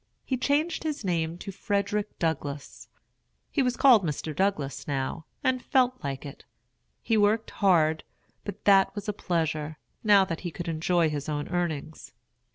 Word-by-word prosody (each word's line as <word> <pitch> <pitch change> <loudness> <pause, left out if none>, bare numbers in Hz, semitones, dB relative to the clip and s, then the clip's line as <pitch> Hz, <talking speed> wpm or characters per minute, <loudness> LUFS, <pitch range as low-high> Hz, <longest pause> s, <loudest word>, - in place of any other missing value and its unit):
He 260 - 0
changed 290 +7 0
his 300 -8 -3
name 165 -2 -1
to 195 - -7
Frederick 205 +2 -2
Douglass. 145 -4 -3 0.6
He 285 - +1
was 250 -2 0
called 250 -8 +6
Mr. 155 -1 -3
Douglass 145 -8 -1
now, 140 +3 -3 0.2
and 255 -1 +1
felt 255 0 +1
like 135 0 -4
it. 140 - -9 0.6
He 225 -1 +2
worked 210 +2 +2
hard, 160 -6 +3 0.4
but 205 -2 -7
that 195 0 +5
was 205 0 -6
a 210 - 0
pleasure, 160 -5 -2 0.3
now 205 -3 +6
that 165 -3 -4
he 175 - -4
could 170 +2 -7
enjoy 165 0 +1
his 145 0 -4
own 145 -1 -2
earnings. 160 -4 -3
175 Hz, 160 wpm, -27 LUFS, 155-210 Hz, 0.6 s, called